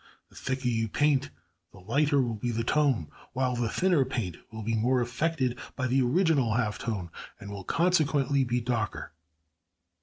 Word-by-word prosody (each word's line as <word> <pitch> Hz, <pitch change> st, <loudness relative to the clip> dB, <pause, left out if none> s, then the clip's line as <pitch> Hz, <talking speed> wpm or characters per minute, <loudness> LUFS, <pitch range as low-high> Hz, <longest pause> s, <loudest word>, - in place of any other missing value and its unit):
The -, -, -21 dB
thicker 130 Hz, 0 st, -3 dB
you 115 Hz, -2 st, +1 dB
paint 145 Hz, +4 st, +2 dB, 0.4 s
the -, -, -16 dB
lighter 140 Hz, +9 st, +2 dB
will 120 Hz, -2 st, -2 dB
be 110 Hz, +3 st, -3 dB
the 115 Hz, 0 st, -1 dB
tone, 130 Hz, -, +1 dB, 0.2 s
while 130 Hz, -1 st, 0 dB
the 120 Hz, -2 st, 0 dB
thinner 175 Hz, 0 st, +3 dB
paint 100 Hz, -10 st, -3 dB, 0.2 s
will 110 Hz, -1 st, -6 dB
be 115 Hz, +2 st, -1 dB
more 125 Hz, +4 st, +2 dB
affected 130 Hz, +1 st, -1 dB, 0.2 s
by 130 Hz, -, -2 dB
the 130 Hz, +2 st, +2 dB
original 135 Hz, -, +2 dB
half 110 Hz, -3 st, 0 dB
tone, 100 Hz, -7 st, -3 dB, 0.3 s
and 100 Hz, -, -8 dB
will 100 Hz, -1 st, -6 dB
consequently 145 Hz, -, +2 dB
be 120 Hz, 0 st, 0 dB
darker. 115 Hz, -6 st, -2 dB
125 Hz, 170 wpm, -28 LUFS, 115-140 Hz, 0.4 s, thinner